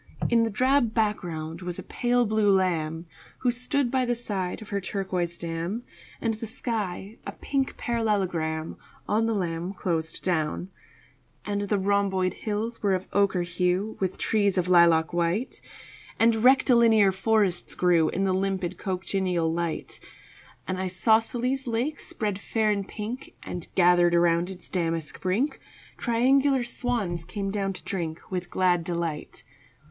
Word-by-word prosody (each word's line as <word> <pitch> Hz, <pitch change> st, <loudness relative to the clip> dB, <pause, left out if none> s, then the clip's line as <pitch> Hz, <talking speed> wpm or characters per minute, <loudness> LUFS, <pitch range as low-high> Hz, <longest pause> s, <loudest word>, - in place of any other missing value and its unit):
In 235 Hz, -1 st, +5 dB
the 230 Hz, -, +2 dB
drab 255 Hz, +1 st, +2 dB
background 175 Hz, -7 st, -1 dB
was 180 Hz, -1 st, -5 dB
a -, -, -6 dB
pale 245 Hz, 0 st, +1 dB
blue 215 Hz, -1 st, +3 dB
lamb 165 Hz, -4 st, +1 dB, 0.4 s
Who 250 Hz, -, +3 dB
stood 250 Hz, +1 st, -1 dB
by 260 Hz, -1 st, +2 dB
the 245 Hz, -1 st, 0 dB
side 195 Hz, -6 st, -3 dB
of 215 Hz, -, -11 dB
her 200 Hz, -1 st, -1 dB
turquoise 185 Hz, -3 st, -2 dB
dam, 170 Hz, +7 st, -4 dB, 0.4 s
And 225 Hz, -1 st, 0 dB
the 220 Hz, +1 st, -5 dB
sky 215 Hz, -3 st, -4 dB
a -, -, -4 dB
pink 270 Hz, -1 st, -2 dB
parallelogram 185 Hz, -9 st, -1 dB, 0.3 s
On 225 Hz, +2 st, +2 dB
the 225 Hz, -, 0 dB
lamb 175 Hz, -1 st, -2 dB
closed 165 Hz, -4 st, -3 dB
down. 175 Hz, +1 st, -1 dB, 0.7 s
And 205 Hz, -1 st, -1 dB
the 205 Hz, -, +2 dB
rhomboid 190 Hz, -2 st, +1 dB
hills 220 Hz, +2 st, -3 dB
were 200 Hz, -2 st, +2 dB
of 185 Hz, 0 st, -5 dB
ochre 195 Hz, -2 st, +2 dB
hue 180 Hz, +4 st, 0 dB
With 190 Hz, -1 st, -1 dB
trees 205 Hz, -3 st, +1 dB
of 180 Hz, -1 st, +1 dB
lilac 170 Hz, -2 st, +5 dB
white, 175 Hz, +8 st, -1 dB, 0.6 s
And 230 Hz, 0 st, +4 dB
rectilinear 235 Hz, -6 st, +5 dB
forests 195 Hz, -2 st, +1 dB
grew 175 Hz, -3 st, +3 dB
In 195 Hz, +2 st, -1 dB
a 190 Hz, -, +2 dB
limpid 190 Hz, -1 st, -1 dB
cochineal 185 Hz, -3 st, -1 dB
light. 170 Hz, -1 st, -3 dB, 0.7 s
An 185 Hz, -, -2 dB
isosceles 225 Hz, +8 st, +1 dB
lake 245 Hz, +6 st, -1 dB
spread 205 Hz, -4 st, -3 dB
fair 215 Hz, +1 st, +1 dB
and 200 Hz, -1 st, -2 dB
pink, 225 Hz, +5 st, -6 dB
And, 175 Hz, -2 st, -6 dB
gathered 175 Hz, -1 st, +5 dB
about 170 Hz, +1 st, +3 dB
its 185 Hz, -2 st, -8 dB
damask 165 Hz, -3 st, -2 dB
brink, 210 Hz, +11 st, 0 dB, 0.4 s
Triangular 265 Hz, +2 st, +3 dB
swans 235 Hz, -9 st, -2 dB
came 195 Hz, +3 st, -4 dB
down 195 Hz, -1 st, -1 dB
to -, -, -10 dB
drink 170 Hz, -3 st, -5 dB
With 180 Hz, -1 st, -3 dB
glad 180 Hz, -2 st, +2 dB
delight. 170 Hz, -3 st, -4 dB
195 Hz, 145 wpm, -26 LUFS, 175-225 Hz, 0.7 s, In